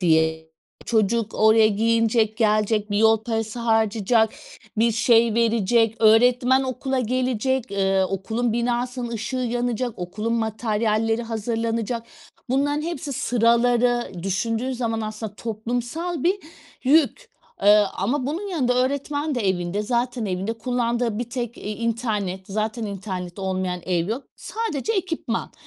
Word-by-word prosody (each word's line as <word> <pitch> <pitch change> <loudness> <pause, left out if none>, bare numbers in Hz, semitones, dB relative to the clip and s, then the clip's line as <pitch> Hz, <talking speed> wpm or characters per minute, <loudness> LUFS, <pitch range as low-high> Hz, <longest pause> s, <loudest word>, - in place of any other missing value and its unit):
Diye 160 -2 +2 0.4
çocuk 225 0 +1
oraya 220 0 +5
giyinecek, 225 0 +2
gelecek, 215 -1 +1
bir 205 - +1
yol 220 0 +4
parası 225 0 -2
harcayacak, 220 -1 +2 0.5
bir 230 +1 +3
şey 230 -1 +4
verecek, 230 -1 +2
öğretmen 245 +4 +5
okula 265 0 -2
gelecek, 255 +1 -1
ııı, 195 -1 +2
okulun 220 +5 -2
binasının 240 +1 -1
ışığı 230 +3 -3
yanacak, 245 -1 -2
okulun 210 +6 -3
materyalleri 225 0 0
hazırlanacak. 230 +1 -2 0.5
Bunların 290 +3 +1
hepsi 330 -3 -4
Sıraları. 240 0 +2
Düşündüğün 225 +7 -1
zaman 230 -2 -2
aslında 215 -1 -5
toplumsal 240 - -3
bir 370 +4 +3 0.5
yük. 320 - +3 0.3
Eee, 210 +1 +6
ama 250 +7 -1
bunun 340 +8 -3
yanında 265 -10 +1
öğretmen 285 +3 -1
de 225 -6 0
evinde. 180 +2 -1
Zaten 240 +1 -1
evinde 190 +3 -2
kullandığı 235 -2 -1
bir 240 0 -4
tek 240 -2 -4
i - - -10
internet. 215 -5 -2
Zaten 215 +3 -2
internet 185 -2 -6
olmayan 185 -2 -2
ev 175 0 0
yok. 245 +5 -3
Sadece 445 -3 -3
ekipman. 330 - -2
230 Hz, 125 wpm, -23 LUFS, 215-245 Hz, 0.5 s, Eee